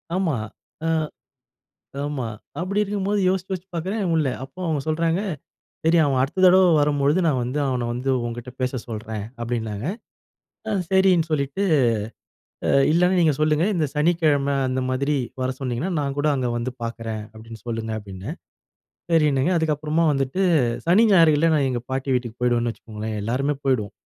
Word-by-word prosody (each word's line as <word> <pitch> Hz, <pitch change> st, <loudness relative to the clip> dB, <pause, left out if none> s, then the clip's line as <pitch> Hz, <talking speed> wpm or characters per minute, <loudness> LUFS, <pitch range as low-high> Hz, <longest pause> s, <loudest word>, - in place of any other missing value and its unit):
ஆமா, 180 Hz, -6 st, +1 dB, 0.5 s
அ -, -, +1 dB, 1.2 s
ஆமா 145 Hz, -4 st, -3 dB, 0.4 s
அப்டி 195 Hz, +3 st, 0 dB
இருக்கும்போது 205 Hz, 0 st, -1 dB
யோசிச்சு, 185 Hz, 0 st, 0 dB
யோசிச்சு 190 Hz, 0 st, -5 dB
பார்க்றேன் 190 Hz, +6 st, -2 dB
முடில்ல. 155 Hz, -5 st, +2 dB
அப்போ 135 Hz, +7 st, -12 dB
அவுங்க 155 Hz, -4 st, 0 dB
சொல்றாங்க 165 Hz, +3 st, +1 dB, 0.6 s
"சரி 165 Hz, +1 st, +4 dB
அவன் 135 Hz, -3 st, +1 dB
அடுத்த 150 Hz, +8 st, -1 dB
தடவ 185 Hz, +1 st, +7 dB, 0.2 s
வரும் 145 Hz, -1 st, +1 dB
பொழுது 145 Hz, +6 st, +3 dB
நான் 145 Hz, -5 st, +2 dB
வந்து, 125 Hz, +4 st, -2 dB
அவன 125 Hz, -3 st, -1 dB
வந்து 125 Hz, +3 st, -2 dB, 0.2 s
உன்கிட்ட 120 Hz, +1 st, -6 dB
பேச 125 Hz, 0 st, 0 dB, 0.2 s
சொல்றேன்" 110 Hz, -2 st, -5 dB, 0.2 s
அப்டின்னாங்க. 115 Hz, -2 st, -3 dB, 0.8 s
அ -, -, -1 dB, 0.2 s
சரின்னு 190 Hz, -3 st, +4 dB
சொல்லிட்டு 145 Hz, +5 st, -1 dB, 1.0 s
"அ -, -, +1 dB, 0.2 s
இல்லனா 180 Hz, +3 st, +3 dB
நீங்க 160 Hz, -3 st, +4 dB
சொல்லுங்க, 155 Hz, +2 st, +2 dB
இந்த 160 Hz, -3 st, +1 dB
சனிக்கிழம 150 Hz, -3 st, +2 dB
அந்த 130 Hz, 0 st, -1 dB
மாதிரி 140 Hz, +3 st, 0 dB, 0.3 s
வர 130 Hz, -, 0 dB
சொன்னிங்கன்னா, 135 Hz, +7 st, -2 dB
நான் 140 Hz, -1 st, -2 dB
கூட 145 Hz, -, +2 dB
அங்கே 125 Hz, -3 st, -1 dB
வந்து 120 Hz, +2 st, -3 dB
பார்க்றேன்" 115 Hz, -2 st, -4 dB
அப்டின்னு 110 Hz, -1 st, -11 dB
சொல்லுங்க 115 Hz, -1 st, -3 dB
அப்டின்னேன், 95 Hz, -2 st, -8 dB, 0.8 s
சரின்னாங்க. 150 Hz, 0 st, +3 dB
அதுக்கப்புறமா 155 Hz, +1 st, +1 dB
வந்துட்டு 135 Hz, +6 st, -1 dB, 0.5 s
சனி 205 Hz, +7 st, +6 dB
ஞாயிறுல 165 Hz, -2 st, +5 dB
நான் 140 Hz, -2 st, +2 dB
எங்க 120 Hz, -2 st, -2 dB
பாட்டி 135 Hz, +1 st, -2 dB
வீட்டுக்கு 120 Hz, -2 st, -3 dB
போயிடுவேன்னு 120 Hz, -1 st, +1 dB
வச்சுக்கோங்களேன், 110 Hz, 0 st, -6 dB
எல்லாருமே 135 Hz, +7 st, 0 dB
போயிடுவோம். 120 Hz, -7 st, +1 dB
140 Hz, 150 wpm, -23 LUFS, 120-165 Hz, 1.2 s, தடவ